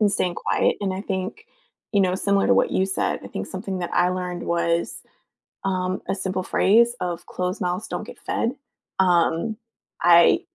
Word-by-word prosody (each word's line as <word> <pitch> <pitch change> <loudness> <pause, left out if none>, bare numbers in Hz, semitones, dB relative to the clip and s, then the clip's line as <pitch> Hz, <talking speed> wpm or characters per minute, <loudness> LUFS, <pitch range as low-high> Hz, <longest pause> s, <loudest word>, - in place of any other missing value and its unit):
and 210 -2 +4
staying 180 -3 0
quiet, - - +1
and 195 -2 -1
I 190 - -4
think, 195 - -4 0.5
you 200 - +4
know, 185 -1 +2
similar 200 +1 +2
to - - +5
what - - +3
you 190 - +1
said, 190 - -1
I - - -7
think 95 - -5
something 190 0 -5
that 175 - -3
I 180 - +3
learned 180 -1 -3
was, 170 0 0 0.6
um, 185 -1 -1
a - - +1
simple 190 -1 -2
phrase 235 +6 +4
of 175 -1 -3
closed 180 0 -3
mouths 180 +4 -2
don't - - -4
get - - -11
fed, 235 - -1 0.5
um, 175 +3 +2 0.5
I 170 -1 +6
185 Hz, 180 wpm, -23 LUFS, 175-195 Hz, 0.6 s, I